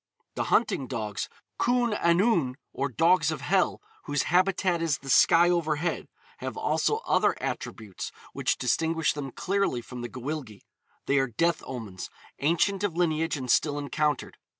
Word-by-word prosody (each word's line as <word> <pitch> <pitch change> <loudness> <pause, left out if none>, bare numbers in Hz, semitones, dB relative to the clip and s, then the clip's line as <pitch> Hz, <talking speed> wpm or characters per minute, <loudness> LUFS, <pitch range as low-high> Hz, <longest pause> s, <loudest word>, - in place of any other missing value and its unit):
The - - -2
hunting 175 - +1
dogs, 110 -5 -4 0.3
Cwn 245 -2 +2
Annwn, 170 - +2 0.2
or 140 - -1
dogs 165 +4 +3
of 155 -4 -3
hell, 185 +6 +1 0.2
whose 145 -2 0
habitat 185 0 +2
is 160 -3 +1
the 135 - -5
sky 170 +5 +6
overhead, 165 -1 -1 0.3
have - - -5
also 440 +1 +1
other - - +3
attributes 105 -5 -5 0.2
which - - 0
distinguish 160 +5 +1
them 145 -2 -5
clearly 195 -3 0
from 125 +1 -8
the 120 - -5
Gwyllgi. 130 -4 -6 0.4
They 140 0 +3
are 135 - +1
death 165 +9 0
omens, 110 -8 -6 0.3
ancient 180 +6 +1
of 180 -5 -1
lineage 165 -2 +1
and 130 -3 -2
still 145 -2 +2
encountered. 145 0 -1
155 Hz, 150 wpm, -27 LUFS, 130-175 Hz, 0.4 s, sky